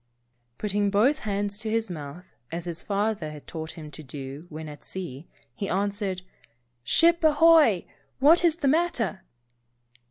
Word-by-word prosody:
Putting 205 -1 0
both 225 +9 +3
hands 205 -1 -2
to 220 -1 -2
his 225 0 0
mouth, 160 0 -8 0.3
as 170 +1 -4
his 170 -1 -4
father 205 -5 -1
had 150 -1 -10
taught 160 -1 -6
him 155 -3 -10
2IO - - -11
Saved. 155 -5 -11
to 145 - -7
do 135 +3 -7
when 155 0 -7
at 150 -1 -10
sea, 170 -5 -7 0.3
he 200 - -4
answered: 195 -1 -1 0.4
" 120 0 -47
Ship 335 0 +5
ahoy! 310 - +5 0.3
What 315 +6 +5
is 335 -3 +4
the 310 -5 -1
matter?" 270 - +1
200 Hz, 165 wpm, -26 LUFS, 160-230 Hz, 0.4 s, Ship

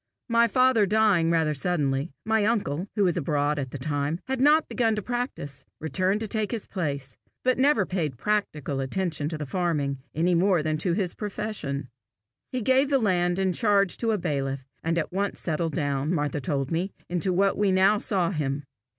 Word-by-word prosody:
My 235 0 +4
father 255 -3 +4
dying 205 -5 +3
rather 160 -2 +2
suddenly, 145 -2 0
my 220 -1 +2
uncle, 200 -6 0
who 205 - +2
was 180 -3 +2
abroad 145 -1 0
at 135 -2 -3
the 145 - -6
time, 145 +1 -1
and 170 - -6
had 265 -1 -1
not 300 +3 +5
begun 225 -3 +1
to 210 - -2
practise, 240 - -4 0.2
returned 185 +7 0
to 220 - -2
take 215 -1 -1
his 230 -4 -3
place, 140 -8 -4 0.3
but 255 0 +2
never 265 -7 +4
paid 160 -9 -2
practical 150 - -1
attention 150 +2 -2
to 160 - -4
the 150 - -4
farming 145 -4 -1 0.2
any 170 +3 +2
more 175 -1 +3
than 155 0 -1
to 175 0 0
his 180 -2 -1
profession. 195 - -4 0.6
He 255 -3 -2
gave 265 +4 +3
the 280 - +4
land 180 -6 +1
in 190 -1 +1
charge 200 -2 +3
to 230 - -1
a 220 - +2
bailiff, 135 -6 -2 0.2
and 165 +1 0
at 160 - -1
once 200 +1 -1
settled 165 -1 -2
down, 145 -1 -1
Martha 145 -1 -1
told 135 +1 -2
me, 175 +4 0 0.2
into 180 +2 -1
what 195 +2 +2
we 205 -2 +2
now 190 +3 +4
saw 190 -4 +1
him. 145 -4 -2
175 Hz, 195 wpm, -26 LUFS, 145-210 Hz, 0.6 s, not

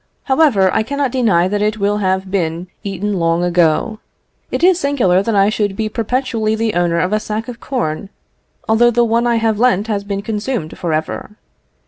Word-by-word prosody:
However, 265 - +3
I - - +2
cannot 280 +3 -2
deny 205 -9 +2
that 205 +2 -1
it 215 +1 0
will 205 0 0
have 190 -1 -1
been 170 -2 -1 0.2
eaten 200 0 -2
long 165 +1 +1
ago. 175 +5 +1 0.5
It - - -3
is 365 -1 +5
singular 245 - +2
that 220 +2 -1
I 200 +1 +4
should 205 -2 -1
be 215 +1 -2
perpetually 225 -1 -1
the 220 -1 -1
owner 175 -1 +1
of 180 +4 0
a 215 - +2
sack 215 +1 -4
of 245 -2 -8
corn, 195 - -3 0.6
although 225 +2 +4
the 240 0 +2
one 235 +1 +1
I 235 - +2
have 225 -2 0
lent 220 -5 +3
has 210 -3 -2
been 200 0 -4
consumed 215 -5 -3
for 170 - -3
ever. 155 +6 -3
210 Hz, 190 wpm, -17 LUFS, 185-230 Hz, 0.6 s, is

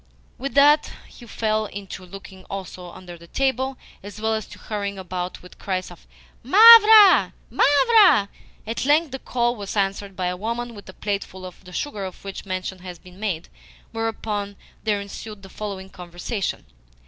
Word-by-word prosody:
With 275 +2 -5
that 295 +2 +5 0.2
he 240 - -15
fell 215 -1 -1
to 195 -2 -9
looking 190 0 -12
also 185 -2 -8
under 175 -1 -12
the 170 - -15
table, 265 +3 -1 0.2
as 205 +1 -10
well 220 +1 0
as 220 -2 -3
to - - -13
hurrying 200 -2 -5
about 180 -1 -6
with 180 - -15
cries 185 -2 -3
of 175 - -16 0.3
"Mavra, 430 - +8 0.2
Mavra!" 375 - +5 0.4
At 225 +1 -3
length 295 +2 +2
the 265 - -5
call 240 -1 -1
was 205 -1 -6
answered 195 0 -2
by 185 - -3
a 180 0 -1
woman 235 +5 -4
with 205 -3 -12
a - - -10
plateful 195 -2 -5
of 185 +1 -12
the 180 - -12
sugar 210 -1 -4
of 185 -1 -8
which 195 0 -7
mention 185 0 -4
has 180 -1 -9
been 180 +3 -17
made; 185 -6 -3 0.4
whereupon 220 -3 -3 0.3
there 210 -2 0
ensued 200 +1 -9
the 195 - -12
following 190 -2 -7
conversation. 180 +3 -5
205 Hz, 170 wpm, -23 LUFS, 185-240 Hz, 0.4 s, Mavra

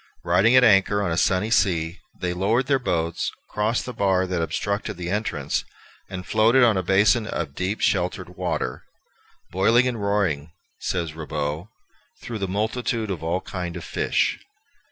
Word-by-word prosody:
Riding 95 +8 +4
at 130 - +7
anchor 100 -2 +4
on 90 - -1
a - - 0
sunny 95 +5 +1
sea, 85 -5 +1 0.2
they 90 -1 -1
lowered 105 +8 +1
their 135 0 +2
boats, 85 -8 -1 0.2
crossed 110 +3 0
the 125 - -6
bar 95 -3 +2
that 90 -2 -2
obstructed 100 +4 -2
the 90 0 -4
entrance, 105 +2 -1 0.5
and 90 -1 -6
floated 115 +4 +4
on 115 -3 +5
a 95 - +1
basin 100 +4 +3
of 80 -8 -3
deep 95 +7 -2
and - - -6
sheltered - - 0
water, 60 - -3 0.7
"boyling 115 +7 +4
and 120 -4 -3
roaring," 90 -7 0 0.3
says 85 -4 -2
Ribaut, 75 +1 -4 0.5
"through 115 -2 -6
the 95 - -2
multitude 110 +2 -1
of 85 -5 -4
all 85 +3 -1
kind 90 -2 -5
of 85 - -7
fish." - - 0
95 Hz, 165 wpm, -24 LUFS, 85-110 Hz, 0.7 s, at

